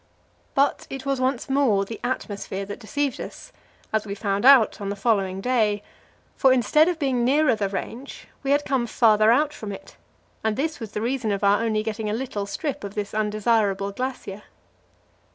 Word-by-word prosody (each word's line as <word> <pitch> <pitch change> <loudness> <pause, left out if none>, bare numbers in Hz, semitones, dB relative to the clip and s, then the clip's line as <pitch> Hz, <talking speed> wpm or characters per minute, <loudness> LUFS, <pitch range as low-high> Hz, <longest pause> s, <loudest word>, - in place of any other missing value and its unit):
But 275 +1 +1
it 270 0 -7
was 275 -2 -1
once 255 -1 0
more 265 -8 +2
the 225 +3 -7
atmosphere 200 -5 -3
that 205 +1 -7
deceived 275 +3 -2
us, - - -9 0.4
as 220 -1 +1
we 200 -1 -5
found 200 +1 -1
out 260 -6 +6
on 200 - -3
the 200 - -2
following 195 -3 0
day, 215 -4 +1 0.5
for 265 - +4
instead 260 +6 +4
of 355 -2 0
being 265 -6 0
nearer 290 +4 +3
the 205 -2 -1
range 235 +7 -6
we 275 - -4
had 285 +1 +2
come 260 -3 0
farther 215 -1 +4
out 295 +4 +2
from 210 -2 -7
it, 195 - -10 0.5
and 220 -1 +1
this 310 +3 -2
was 220 -3 -8
the 210 - -3
reason 235 -2 -1
of 200 0 -2
our 200 +2 +4
only 215 -2 0
getting 220 -1 -3
a - - -1
little 220 -4 -3
strip 250 +7 -4
of 200 0 -7
this 205 -1 -4
undesirable 210 -2 +1
glacier. 230 -3 -5
225 Hz, 190 wpm, -24 LUFS, 205-265 Hz, 0.5 s, out